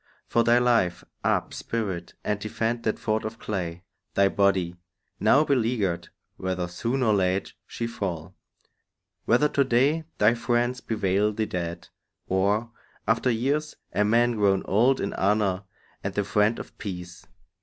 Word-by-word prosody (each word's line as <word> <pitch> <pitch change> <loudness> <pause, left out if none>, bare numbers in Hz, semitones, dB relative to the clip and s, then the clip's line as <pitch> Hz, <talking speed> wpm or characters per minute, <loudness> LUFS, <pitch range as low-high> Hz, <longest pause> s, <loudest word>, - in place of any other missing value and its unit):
For 115 - +2
thy 120 +1 +5
life, 115 -8 +2 0.2
Up, - - +1
spirit, 95 -7 -4
and 105 -1 -1
defend 115 +2 -2
that 110 - +1
fort 110 0 -1
of 110 +1 -5
clay, 90 -5 -4 0.3
Thy 100 0 +5
body, 95 -3 +2 0.4
now 145 - +5
beleaguered; 115 - 0 0.3
whether 95 -1 -2
soon 115 +9 -1
Or 110 -3 +4
late 95 -1 0
she 115 - -4
fall; 95 -6 -4 0.9
whether 125 +6 +4
to 140 - +3
day 135 +6 +2
thy 105 +3 +5
friends 120 +1 0
Bewail 105 -1 +1
thee 110 +1 -1
dead, 85 -3 -4 0.4
or, 100 +5 +1 0.4
after 115 +3 +2
years, 140 +6 0 0.2
a 100 +4 +3
man 120 +3 +3
Grown 100 -2 +3
old 120 +7 +3
in 100 - -2
honour 100 -1 +1 0.4
and 100 0 -3
the 105 - +1
friend 105 +3 +2
of - - -9
peace. 90 -2 -7
105 Hz, 145 wpm, -26 LUFS, 95-120 Hz, 0.9 s, thy